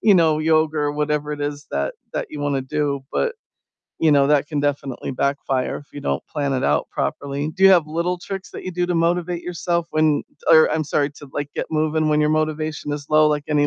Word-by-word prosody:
you 210 Hz, -, +6 dB
know, 160 Hz, -4 st, +4 dB
yoga 155 Hz, 0 st, +2 dB
or 145 Hz, 0 st, 0 dB
whatever 150 Hz, 0 st, -1 dB
it 145 Hz, -, -6 dB
is 145 Hz, 0 st, -4 dB
that 70 Hz, 0 st, -1 dB, 0.2 s
that -, -, -2 dB
you 150 Hz, -, -6 dB
wanna 140 Hz, -2 st, 0 dB
do 140 Hz, 0 st, -1 dB
but, 475 Hz, 0 st, 0 dB, 0.7 s
you 160 Hz, -, +4 dB
know, 140 Hz, -1 st, +5 dB
that 145 Hz, 0 st, +3 dB
can 150 Hz, -, -2 dB
definitely 140 Hz, -2 st, -2 dB
backfire 135 Hz, -1 st, -1 dB
if 145 Hz, -, -15 dB
you 145 Hz, -, -7 dB
don't 70 Hz, -, -1 dB
plan 140 Hz, -2 st, -1 dB
it 130 Hz, -, 0 dB
out -, -, +1 dB
properly. 140 Hz, +2 st, -2 dB
Do 190 Hz, -, -2 dB
you 195 Hz, -, +9 dB
have 175 Hz, -5 st, +5 dB
little 170 Hz, +3 st, -1 dB
tricks 195 Hz, +1 st, -6 dB
that -, -, -8 dB
you 185 Hz, -, -4 dB
do 175 Hz, 0 st, 0 dB
to 180 Hz, -, -1 dB
motivate 170 Hz, +1 st, 0 dB
yourself 170 Hz, -1 st, -2 dB
when 155 Hz, -2 st, +2 dB, 0.3 s
Or 160 Hz, -1 st, +7 dB
I'm 155 Hz, 0 st, 0 dB
sorry, 145 Hz, 0 st, 0 dB
to, 145 Hz, -1 st, -13 dB
like, 145 Hz, -1 st, -3 dB
get -, -, -2 dB
moving 155 Hz, 0 st, +1 dB
when 150 Hz, 0 st, +3 dB
your 150 Hz, -, +3 dB
motivation 155 Hz, -1 st, -1 dB
is 145 Hz, -1 st, -5 dB
low? 155 Hz, 0 st, +5 dB
Like, 150 Hz, -1 st, -1 dB
any 145 Hz, -1 st, +3 dB
150 Hz, 230 wpm, -21 LUFS, 145-160 Hz, 0.7 s, you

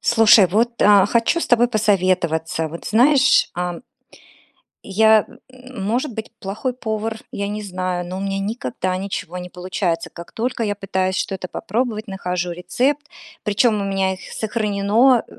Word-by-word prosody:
Слушай, 225 Hz, -4 st, +6 dB
вот, 230 Hz, +6 st, 0 dB
а, 205 Hz, -2 st, +6 dB
хочу 235 Hz, +8 st, +1 dB
с -, -, -2 dB
тобой 240 Hz, 0 st, +5 dB
посоветоваться. 180 Hz, -7 st, +1 dB
Вот 170 Hz, +2 st, -9 dB
знаешь, 260 Hz, +5 st, +4 dB
а 175 Hz, 0 st, -3 dB, 1.0 s
Я, 220 Hz, +2 st, +4 dB, 0.2 s
может 255 Hz, 0 st, -4 dB
быть, 220 Hz, 0 st, -6 dB
плохой 210 Hz, +6 st, -3 dB
повар, 220 Hz, -2 st, -4 dB
я 200 Hz, 0 st, -3 dB
не 210 Hz, +1 st, -4 dB
знаю, 185 Hz, -2 st, -3 dB
но 180 Hz, +1 st, -6 dB
у -, -, -4 dB
меня 195 Hz, 0 st, -2 dB
никогда 190 Hz, -, -3 dB
ничего 185 Hz, -2 st, -5 dB
не 180 Hz, 0 st, -7 dB
получается. 180 Hz, -2 st, -2 dB
Как 170 Hz, 0 st, -11 dB
только 240 Hz, +1 st, -2 dB
я 205 Hz, -2 st, 0 dB
пытаюсь 190 Hz, -1 st, -2 dB
что-то 190 Hz, -2 st, -3 dB
попробовать, 220 Hz, +3 st, -3 dB
нахожу 180 Hz, -2 st, -3 dB
рецепт, 265 Hz, +12 st, -1 dB, 0.4 s
причём 210 Hz, +1 st, +2 dB
у -, -, -2 dB
меня 195 Hz, -1 st, 0 dB
их 185 Hz, -, -12 dB
сохранено 220 Hz, +3 st, +2 dB
200 Hz, 150 wpm, -20 LUFS, 185-230 Hz, 1.0 s, Слушай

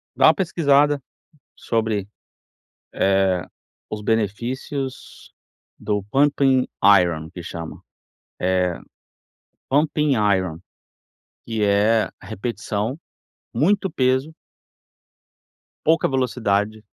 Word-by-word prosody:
Dá -, -, +5 dB
uma -, -, +7 dB
pesquisada 145 Hz, -6 st, +2 dB, 0.5 s
sobre, 110 Hz, -3 st, -1 dB, 0.9 s
eh, 95 Hz, -2 st, +2 dB, 0.5 s
os 105 Hz, -, -5 dB
benefícios 120 Hz, +6 st, -3 dB, 0.5 s
do 105 Hz, -2 st, -2 dB
pump 140 Hz, +1 st, +2 dB, 0.6 s
iron, 80 Hz, -3 st, -2 dB
que 90 Hz, -2 st, -9 dB
chama. 80 Hz, -1 st, -7 dB
Eh, -, -, -30 dB, 1.7 s
pump 145 Hz, +3 st, +2 dB
iron, 100 Hz, -, +1 dB, 0.9 s
que 110 Hz, -2 st, -1 dB
é 105 Hz, +2 st, +3 dB
repetição, 105 Hz, +3 st, -4 dB, 0.6 s
muito 190 Hz, -, +2 dB
peso 130 Hz, +2 st, 0 dB, 1.5 s
pouca 160 Hz, +1 st, +3 dB
velocidade 110 Hz, -5 st, -1 dB
115 Hz, 80 wpm, -22 LUFS, 100-140 Hz, 1.7 s, uma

